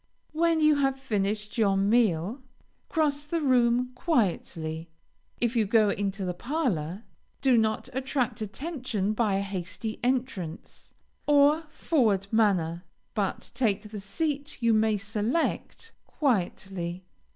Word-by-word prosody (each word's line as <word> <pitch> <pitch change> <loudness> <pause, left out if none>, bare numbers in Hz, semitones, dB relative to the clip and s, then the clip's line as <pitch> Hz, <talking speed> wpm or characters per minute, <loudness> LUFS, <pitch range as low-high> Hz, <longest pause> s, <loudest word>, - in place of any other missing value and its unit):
When 330 +1 +2
you 305 -1 +5
have 270 -1 +1
finished 210 -2 -2
your 200 -3 +3
meal, 205 - +2 0.5
cross 300 -4 +1
the 330 +3 -2
room 250 -3 +3
quietly; 170 - -1 0.5
if 240 0 +1
you 220 -3 +2
go 215 -1 +4
into 195 -1 -2
the 180 - -1
parlor, 205 - -2 0.4
do 265 -2 +4
not 220 0 +1
attract 260 -3 -1
attention 225 - -2
by 215 -3 +1
a 195 - +1
hasty 200 +3 -4
entrance, 245 -10 -3 0.4
or 295 +2 +5
forward 235 - +1
manner, 180 -6 +2 0.3
but 200 -3 -2
take 215 -4 0
the 210 - -5
seat 285 +8 -3
you 230 -2 +3
may 215 -1 +3
select, 220 - -2 0.2
quietly. 185 - -1
220 Hz, 120 wpm, -28 LUFS, 195-270 Hz, 0.5 s, you